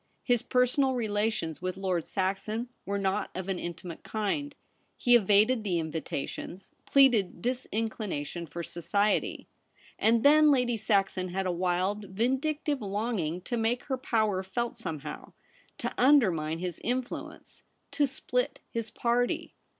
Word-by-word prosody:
His 245 -3 +2
personal 255 +1 +2
relations 210 -8 -1
with 185 0 -3
Lord 185 -4 -1
Saxon 200 +5 -2 0.2
were 200 0 0
not 195 +1 0
of 185 0 -4
an 185 -2 -1
intimate 170 0 -6
kind. 280 +7 -2 0.4
He 245 -1 +5
evaded 215 +2 +4
the 185 -4 0
invitations, 160 +3 -5 0.2
pleaded 245 -11 +4
disinclination 215 - -3
for 170 +4 -6
society. 200 +6 0 0.5
And 230 +1 +3
then 305 +1 +7
Lady 250 -4 +3
Saxon 195 -3 +1
had 190 +2 -2
a 185 - +1
wild, 185 +4 0
vindictive 265 +8 0
longing 200 -5 -2
to 240 +6 -3
make 230 +2 0
her 270 -3 -2
power 215 -6 +1
felt 235 +5 -3
somehow; 155 -9 -6 0.4
to - - -3
undermine 185 - +4
his 175 -1 -4
influence; 250 +1 -4 0.3
to 290 -2 +2
split - - -2
his 230 -1 -3
party. 240 +2 0
210 Hz, 130 wpm, -29 LUFS, 185-245 Hz, 0.5 s, then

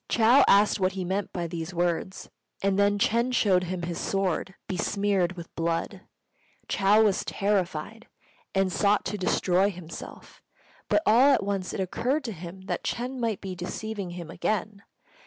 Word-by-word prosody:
Chou 240 +5 +5
asked 205 +1 +5
what 185 0 +1
he 190 -2 -4
meant 190 +2 -2
by 175 -1 -3
these 165 +1 -5
words; 175 +2 -1 0.4
and 195 0 +2
then 205 0 +3
Ch'êng 235 +4 +1
shewed 190 -7 +3
him 180 0 -4
his 170 0 -3
sword 190 -1 -1
besmeared 195 -1 0
with 170 -2 -10
blood. 170 +4 -2 0.7
Chou 205 +2 +4
was 205 -3 +2
terrified, 200 +1 -2 0.5
and 190 -1 +2
sought 205 0 +2
to - - -2
destroy 185 +1 +2
himself; 175 -4 -10 0.5
but 315 - +3
all 250 +6 +6
at - - -2
once 195 -2 -2
it - - -5
occurred 250 - -1
to 235 - -4
him 180 0 -9
that 190 - -4
Ch'êng 250 +2 -3
might 225 -4 -1
be 190 -1 -5
deceiving 195 +2 -5
him 170 -2 -7
again. 210 +1 -2
195 Hz, 160 wpm, -27 LUFS, 180-210 Hz, 0.7 s, all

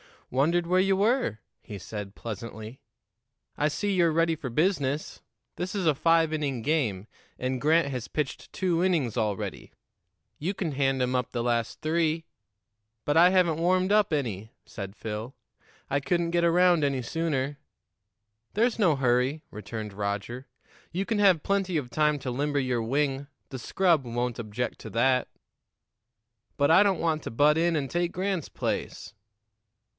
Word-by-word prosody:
"Wondered 165 +7 +2
where 180 +2 +2
you 195 +1 +3
were," 205 - +1 0.2
he 105 - -8
said 100 +1 -7
pleasantly. 115 +1 -7 0.8
"I 150 - +2
see 200 +7 -1
you're 170 -3 +3
ready 165 0 +2
for 140 -4 -6
business. 150 0 0 0.4
This 180 +3 -4
is 195 -3 -1
a 155 - +4
five 165 +2 +3
inning 140 -6 -2
game, 115 -9 0 0.3
and 130 0 -2
Grant 160 0 +3
has 125 -4 -4
pitched 150 -3 -4
two 175 -3 0
innings 155 - +1
already; 105 -4 -3 0.7
you 175 +7 -1
can 180 -5 -3
hand 135 -1 +1
'em 125 +1 0
up 125 -1 -1
the 120 -1 -2
last 120 -2 -1
three." 160 0 0 0.8
"But 145 - +1
I 175 +2 +8
haven't 180 -4 +3
warmed 185 +3 +2
up 210 -5 +3
any," 110 -8 -2 0.2
said 100 -1 -7
Phil. 110 +4 -6 0.5
"I 140 - +1
couldn't 170 +3 0
get 170 0 +2
around 175 -1 +4
any 140 -2 +1
sooner." 145 0 -2 0.9
"There's 230 +2 +1
no 175 -8 +4
hurry," 130 +3 +1
returned 105 0 -6
Roger. 105 +6 -4 0.5
"You 190 +3 -1
can 220 -1 -1
have 190 -6 +4
plenty 195 -2 0
of 140 -6 -1
time 150 +2 +2
to 130 - -4
limber 145 +3 0
your 125 -3 0
wing; 135 +3 -1 0.2
the 130 - -6
scrub 165 +1 +2
won't 120 0 -2
object 115 +2 -4
to - - -8
that." 125 +2 +2 1.3
"But 145 +1 +3
I 175 +4 +7
don't 195 -4 +1
want 160 -2 0
to - - -5
butt 145 +6 +4
in 170 0 +2
and 140 -3 -2
take 175 0 0
Grant's 185 -3 -2
place." - - -4
150 Hz, 160 wpm, -27 LUFS, 125-170 Hz, 1.3 s, I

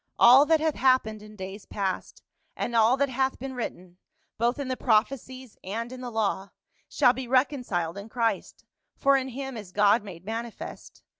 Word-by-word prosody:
All 260 +5 +8
that 320 -1 +4
hath 315 0 +1
happened 255 -6 +2
in 215 0 -13
days 195 +1 -8
past, 195 -2 -4 0.3
and 235 - -3
all 230 +3 +5
that 280 0 +1
hath 265 +1 0
been 265 +1 -6
written, 185 -7 -6 0.4
both 240 +2 +1
in 280 -2 -4
the 260 - -1
prophecies 255 +1 -1
and 230 +5 -4
in 255 0 -8
the 250 - -5
law, 205 -3 -1 0.4
shall 245 - +4
be 260 -1 -6
reconciled 245 - 0
in 205 +3 -10
Christ, 230 -1 -2 0.3
for 275 0 +4
in 265 -1 0
him 270 0 -6
is 205 -5 -8
God 205 +3 +4
made 185 -3 -10
mani 230 +2 -3
fest. - - -10
235 Hz, 180 wpm, -27 LUFS, 210-260 Hz, 0.4 s, All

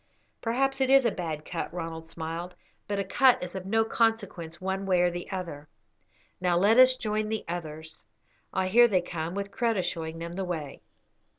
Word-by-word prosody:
"Perhaps 270 +4 0
it 265 - +3
is 270 -1 +6
a 235 - +3
bad 160 -5 -4
cut," 170 - -4
Ronald 165 -1 -6
smiled, 165 +2 -5 0.3
"but 205 - -2
a 200 - 0
cut 245 +6 +4
is 180 - -6
of 190 -1 -6
no 225 +2 +2
consequence 210 -8 -1
one 190 +1 -3
way 180 -2 +3
or 175 0 +3
the 175 0 -6
other. 165 -6 -5 0.7
Now 180 -1 +2
let 210 +7 +5
us 255 0 +7
join 215 -2 -1
the 220 -1 -3
others. 160 -2 -6 0.5
Ah, 190 - 0
here 235 +6 +6
they 190 -5 +2
come, 170 0 -4
with 200 0 -4
Kreta 230 -4 0
showing 165 -2 -4
them 170 +1 -6
the 190 +2 -3
way." 160 -6 -5
185 Hz, 190 wpm, -28 LUFS, 170-220 Hz, 0.7 s, us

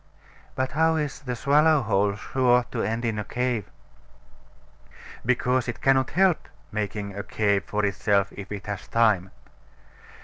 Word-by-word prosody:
But 130 0 -1
how 160 +2 +2
is 150 -3 -2
the 125 -3 -4
swallow 150 +3 +3
hole 100 -2 +1
sure 125 +2 +2
to 115 - -2
end 115 +2 -2
in 110 -2 -1
a - - -2
cave? 125 -2 -2 1.5
Because 125 +1 +1
it 120 - -4
cannot 135 -1 +3
help 190 -3 +3 0.2
making 105 -1 -4
a 100 - -3
cave 100 -1 0
for 105 0 -1
itself 100 0 +1
if 100 0 -9
it 105 -1 -6
has 100 -1 -5
time. 105 -5 +2
115 Hz, 145 wpm, -25 LUFS, 105-130 Hz, 1.5 s, swallow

